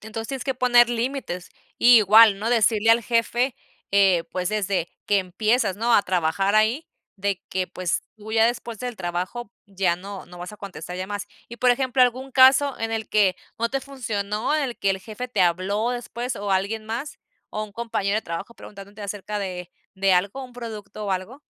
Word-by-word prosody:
Entonces 220 Hz, +1 st, -6 dB
tienes 265 Hz, -3 st, -4 dB
que 265 Hz, -, -1 dB
poner 245 Hz, -1 st, +5 dB
límites 240 Hz, -6 st, -3 dB, 0.3 s
y 240 Hz, 0 st, +8 dB
igual, 215 Hz, 0 st, +7 dB
¿no?, 220 Hz, +3 st, -2 dB
decirle 225 Hz, -1 st, +3 dB
al 230 Hz, +1 st, +5 dB
jefe, 240 Hz, +2 st, +1 dB, 0.4 s
eh, 190 Hz, -4 st, +4 dB
pues 180 Hz, -1 st, -1 dB
desde 200 Hz, -5 st, -1 dB, 0.2 s
que 205 Hz, -, +3 dB
empiezas, 200 Hz, +2 st, 0 dB
¿no?, 230 Hz, +2 st, +2 dB
a 205 Hz, -, +5 dB
trabajar 185 Hz, +2 st, 0 dB
ahí, 220 Hz, +9 st, +2 dB, 0.3 s
de 195 Hz, -1 st, -2 dB
que, 185 Hz, -1 st, -1 dB
pues, 180 Hz, -1 st, -2 dB
tú 215 Hz, 0 st, -9 dB
ya 225 Hz, 0 st, +5 dB
después 235 Hz, -2 st, -3 dB
del 245 Hz, -2 st, -5 dB
trabajo 185 Hz, +5 st, -4 dB
ya 190 Hz, -3 st, 0 dB
no, 195 Hz, +2 st, -8 dB
no 180 Hz, 0 st, -13 dB
vas 180 Hz, +3 st, -7 dB
a -, -, -10 dB
contestar 190 Hz, -3 st, -8 dB
llamadas. 200 Hz, +2 st, -4 dB, 0.2 s
Y, 235 Hz, -, -10 dB
por 255 Hz, -, +3 dB
ejemplo, 255 Hz, 0 st, +2 dB
¿algún 255 Hz, +2 st, 0 dB
caso 265 Hz, +2 st, +5 dB
en 225 Hz, 0 st, -2 dB
el 220 Hz, -1 st, -3 dB
que 200 Hz, -4 st, +3 dB, 0.2 s
no 230 Hz, +1 st, +1 dB
te 270 Hz, +3 st, -2 dB
funcionó?, 220 Hz, -4 st, -3 dB
¿en 310 Hz, -, +1 dB
el 250 Hz, -4 st, -3 dB
que 200 Hz, -, 0 dB
el 190 Hz, -, -1 dB
jefe 225 Hz, +5 st, -7 dB
te 215 Hz, -6 st, +1 dB
habló 190 Hz, +6 st, +1 dB
después 245 Hz, 0 st, -4 dB
o 205 Hz, 0 st, -4 dB
alguien 200 Hz, +3 st, -1 dB
más 245 Hz, +7 st, -5 dB, 0.3 s
o 215 Hz, -, -3 dB
un 210 Hz, -1 st, -8 dB
compañero 215 Hz, -3 st, -2 dB
de 220 Hz, -, -1 dB
trabajo 170 Hz, +8 st, -6 dB
preguntándote 200 Hz, 0 st, -11 dB
acerca 205 Hz, +1 st, -4 dB
de 180 Hz, -3 st, -5 dB, 0.2 s
de 195 Hz, 0 st, +2 dB
algo, 200 Hz, +9 st, 0 dB
un 250 Hz, -, -13 dB
producto 215 Hz, -4 st, -7 dB
o 200 Hz, -, -3 dB
algo? 190 Hz, +9 st, -4 dB
215 Hz, 200 wpm, -24 LUFS, 195-240 Hz, 0.4 s, y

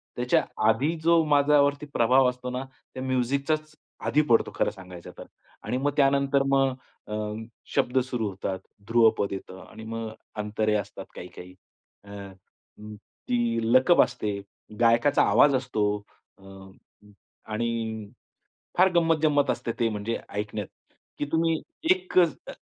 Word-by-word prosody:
त्याच्या 125 Hz, 0 st, +2 dB, 0.2 s
आधी 130 Hz, +9 st, +2 dB
जो 165 Hz, 0 st, +5 dB
माझ्यावरती 145 Hz, 0 st, +3 dB
प्रभाव 125 Hz, +2 st, +4 dB
असतो 125 Hz, 0 st, -6 dB
ना, 125 Hz, +1 st, -3 dB, 0.3 s
त्या 130 Hz, -, -5 dB
म्युझिकचाच 140 Hz, +5 st, -1 dB, 0.3 s
आधी 150 Hz, -, +3 dB
पडतो 115 Hz, -, +3 dB
खरं -, -, +1 dB
सांगायचं 90 Hz, -4 st, -11 dB
तर -, -, -9 dB, 0.4 s
आणि 125 Hz, -, -2 dB
मग 145 Hz, +2 st, 0 dB
त्यानंतर 140 Hz, 0 st, +3 dB
मग 135 Hz, -1 st, +3 dB, 0.3 s
अ, 105 Hz, -, -6 dB, 0.6 s
शब्द 125 Hz, +2 st, +1 dB
सुरू 125 Hz, -4 st, -2 dB
होतात, 95 Hz, 0 st, -4 dB, 0.3 s
ध्रुवपद 115 Hz, -3 st, +3 dB
येतं 95 Hz, -1 st, -8 dB
आणि 110 Hz, -, -11 dB
मग 115 Hz, 0 st, -5 dB, 0.3 s
अंतरे 105 Hz, 0 st, -1 dB
असतात 105 Hz, -, -4 dB
काही-काही. 90 Hz, +1 st, -10 dB, 0.5 s
अ, 100 Hz, -, -16 dB, 0.7 s
उम्म, 105 Hz, 0 st, -9 dB
ती 115 Hz, +2 st, -2 dB
लकप 130 Hz, +7 st, +6 dB
असते, 105 Hz, -5 st, -1 dB, 0.4 s
गायकाचा 115 Hz, +4 st, +4 dB
आवाज 145 Hz, -2 st, +5 dB
असतो 125 Hz, -5 st, 0 dB, 0.5 s
अ, -, -, -24 dB
उम्म, 95 Hz, +1 st, -16 dB, 0.4 s
आणि 110 Hz, -2 st, -3 dB, 0.7 s
फार 185 Hz, +1 st, +7 dB
गंमत-जंमत 155 Hz, -4 st, +3 dB
असते 115 Hz, -, -2 dB
ते 115 Hz, -, +3 dB
म्हणजे 105 Hz, +2 st, -3 dB
ऐकण्यात, 105 Hz, -1 st, -4 dB, 0.5 s
की 145 Hz, -, -2 dB
तुम्ही 165 Hz, -1 st, +1 dB, 0.3 s
एकच 185 Hz, -, +2 dB
अ, -, -, -5 dB
125 Hz, 130 wpm, -26 LUFS, 105-140 Hz, 0.7 s, फार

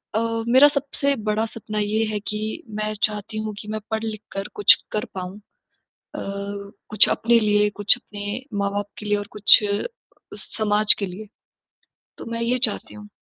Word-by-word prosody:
अ, 230 Hz, 0 st, -1 dB
मेरा 260 Hz, +4 st, +7 dB
सबसे 280 Hz, 0 st, -1 dB
बड़ा 215 Hz, +1 st, +1 dB
सपना 215 Hz, -1 st, -6 dB
ये 210 Hz, +2 st, 0 dB
है 215 Hz, -1 st, -2 dB
कि 210 Hz, -, -3 dB, 0.4 s
मैं 215 Hz, 0 st, -2 dB
चाहती 210 Hz, +1 st, -1 dB
हूँ 215 Hz, -, -4 dB
कि 210 Hz, -, -10 dB
मैं 215 Hz, 0 st, -3 dB
पढ़-लिखकर 215 Hz, -2 st, -4 dB
कुछ 415 Hz, -, +7 dB, 0.2 s
कर 215 Hz, -, -2 dB
पाऊँ। 185 Hz, +1 st, -6 dB, 0.6 s
अ, -, -, -11 dB, 0.7 s
कुछ 215 Hz, -1 st, +6 dB
अपने 235 Hz, +1 st, +3 dB
लिए, 210 Hz, -1 st, +3 dB
कुछ 205 Hz, +2 st, +3 dB
अपने 205 Hz, 0 st, -6 dB, 0.2 s
माँ-बाप 200 Hz, 0 st, -1 dB
के 210 Hz, -, -8 dB
लिए 210 Hz, 0 st, +2 dB
और 205 Hz, -, -6 dB
कुछ 205 Hz, +1 st, +7 dB
अ, 205 Hz, 0 st, -1 dB, 0.5 s
समाज 210 Hz, -1 st, +3 dB
के 200 Hz, -, -2 dB
लिए। 190 Hz, +4 st, -8 dB, 0.9 s
तो -, -, -9 dB
मैं 230 Hz, 0 st, -3 dB
ये 240 Hz, +2 st, +1 dB
चाहती 210 Hz, -, -7 dB
हूँ। 210 Hz, 0 st, -11 dB
215 Hz, 170 wpm, -22 LUFS, 205-225 Hz, 0.9 s, मेरा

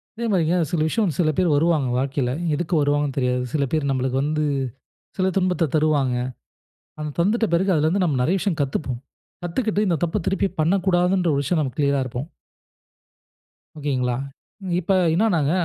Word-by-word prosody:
அதே 235 Hz, +1 st, -4 dB
மாரிங்க 175 Hz, -2 st, +2 dB
சில 165 Hz, -3 st, 0 dB
விஷயம் 225 Hz, +7 st, 0 dB
வந்து, 155 Hz, -6 st, -2 dB
சில 155 Hz, -, +2 dB
பேரு 180 Hz, -2 st, +3 dB
வருவாங்க, 155 Hz, -3 st, +2 dB
வாழ்க்கைல. 135 Hz, -1 st, -1 dB, 0.2 s
எதுக்கு 175 Hz, +2 st, -3 dB
வருவாங்கன்னு 145 Hz, -1 st, 0 dB
தெரியாது, 125 Hz, -1 st, +1 dB
சில 150 Hz, -3 st, +1 dB
பேரு 155 Hz, -3 st, 0 dB
நம்மளுக்கு 130 Hz, 0 st, -1 dB
வந்து, 155 Hz, +1 st, 0 dB, 0.7 s
சில 185 Hz, -, +2 dB
துன்பத்த 180 Hz, -4 st, +1 dB
தருவாங்க. 150 Hz, -5 st, +2 dB, 0.9 s
அத 150 Hz, -1 st, -3 dB
தந்துட்ட 220 Hz, +6 st, +2 dB
பிறகு 190 Hz, +3 st, +2 dB
அதுல 155 Hz, 0 st, +2 dB
இருந்து 185 Hz, +3 st, +2 dB
நம்ம 145 Hz, -7 st, 0 dB
நெறைய 180 Hz, +9 st, +2 dB
விஷயம் 180 Hz, -4 st, -1 dB
கத்துப்போம். 135 Hz, -3 st, -3 dB, 0.4 s
கத்துக்கிட்டு, 210 Hz, +3 st, 0 dB
இந்த 170 Hz, -4 st, +1 dB
தப்ப 175 Hz, +4 st, -1 dB
திருப்பி 195 Hz, 0 st, +1 dB
பண்ணக்கூடாதுன்ற 180 Hz, +1 st, +2 dB
ஒரு 140 Hz, -, +1 dB
விஷயம், 160 Hz, +2 st, +1 dB
நம்ம 130 Hz, -3 st, -4 dB
க்ளியரா 140 Hz, -1 st, +2 dB
இருப்போம். 130 Hz, +4 st, -5 dB, 1.5 s
ஓகேங்களா. 130 Hz, -4 st, -1 dB, 0.5 s
நீங் 180 Hz, -2 st, -1 dB
இப்ப 190 Hz, +4 st, 0 dB, 0.2 s
என்னனாங்க, 170 Hz, -8 st, +2 dB
155 Hz, 160 wpm, -22 LUFS, 140-180 Hz, 1.5 s, பேரு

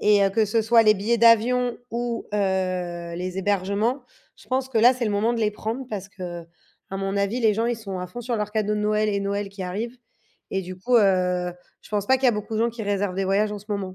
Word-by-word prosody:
Et 205 Hz, -1 st, +4 dB
heu, 195 Hz, -, +2 dB
que 220 Hz, +3 st, +2 dB
ce 220 Hz, +2 st, +1 dB
soit 225 Hz, +1 st, +5 dB
les 215 Hz, -1 st, +5 dB
billets 220 Hz, +4 st, 0 dB
d'avion 235 Hz, +2 st, +4 dB
ou, 235 Hz, +1 st, -3 dB
heu, -, -, +1 dB, 0.8 s
les 185 Hz, +1 st, -4 dB
hébergements, 205 Hz, +6 st, 0 dB, 0.3 s
je -, -, -18 dB
pense 260 Hz, 0 st, 0 dB
que 260 Hz, -, -4 dB
là 245 Hz, +3 st, +7 dB
c'est 250 Hz, -1 st, -3 dB
le -, -, 0 dB
moment 215 Hz, +3 st, +1 dB
de 230 Hz, -, -2 dB
les 215 Hz, -1 st, +2 dB
prendre, 225 Hz, +5 st, -4 dB
parce 200 Hz, -2 st, -5 dB
que, 175 Hz, -4 st, -7 dB, 0.5 s
à 195 Hz, -, -3 dB
mon 195 Hz, 0 st, -2 dB
avis, 200 Hz, +5 st, 0 dB
les 220 Hz, -3 st, +3 dB
gens 225 Hz, +2 st, 0 dB
ils 240 Hz, 0 st, 0 dB
sont 200 Hz, -4 st, -6 dB
à 180 Hz, -, -4 dB
fond 240 Hz, +7 st, -7 dB
sur 240 Hz, 0 st, -3 dB
leurs 210 Hz, -1 st, -2 dB
cadeaux 210 Hz, -1 st, 0 dB
de 210 Hz, -, -1 dB
Noël 215 Hz, 0 st, +1 dB
et 200 Hz, -1 st, 0 dB
Noël 200 Hz, 0 st, -2 dB
qui 195 Hz, -1 st, -8 dB
arrive. 215 Hz, +7 st, -4 dB, 0.5 s
Et 195 Hz, -, -1 dB
du 185 Hz, 0 st, -8 dB
coup, 245 Hz, +6 st, +2 dB
heu, 180 Hz, -4 st, +2 dB, 0.3 s
je -, -, -17 dB
pense 205 Hz, -1 st, -1 dB
pas 265 Hz, -, +5 dB
qu'il 265 Hz, -, -5 dB
y -, -, +7 dB
a -, -, +3 dB
beaucoup 210 Hz, +1 st, -4 dB
de -, -, 0 dB
gens 235 Hz, -, +2 dB
qui 230 Hz, 0 st, -7 dB
réservent 200 Hz, -2 st, -1 dB
des 195 Hz, +1 st, -1 dB
voyages 205 Hz, +2 st, +1 dB
en 210 Hz, -, -5 dB
ce 210 Hz, -, -19 dB
moment. 200 Hz, -3 st, -3 dB
210 Hz, 265 wpm, -24 LUFS, 195-230 Hz, 0.8 s, là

